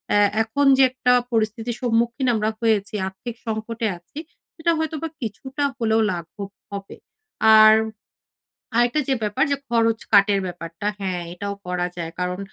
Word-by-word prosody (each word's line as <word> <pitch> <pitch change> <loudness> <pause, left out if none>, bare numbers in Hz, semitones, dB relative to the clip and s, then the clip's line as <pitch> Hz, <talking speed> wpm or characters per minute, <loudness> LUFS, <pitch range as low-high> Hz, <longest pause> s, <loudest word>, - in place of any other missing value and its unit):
এ - - +5 0.3
এখন 255 +6 0
যে 270 - +6
একটা 255 -1 +1 0.2
পরিস্থিতির 225 +1 -1
সম্মুখীন 235 +2 +1
আমরা 215 0 0
হয়েছি, 215 -3 +1
আর্থিক 205 +5 -7
সংকটে 225 +1 -3
আছি 175 - -11 0.4
সেটা 335 +1 +1
হয়তো 315 0 -2
বা - - 0
কিছুটা 265 +6 -4
হলেও 225 -2 +2
লাঘব 185 +3 -6 0.2
হবে। 200 -1 -7 0.6
আর 215 0 +9 1.0
আরেকটা 240 +5 +3
যে 270 - +3
ব্যাপার 210 -1 +1
যে, 280 - +2
খরচ 230 -1 +2
কাটের 200 -1 +5
ব্যাপারটা, 175 +1 -7
হ্যাঁ 185 -3 -2
এটাও 200 +3 -4
করা 180 0 -1
যায়। 165 -1 -5
কারণ 180 0 -2
220 Hz, 150 wpm, -22 LUFS, 195-240 Hz, 1.0 s, আর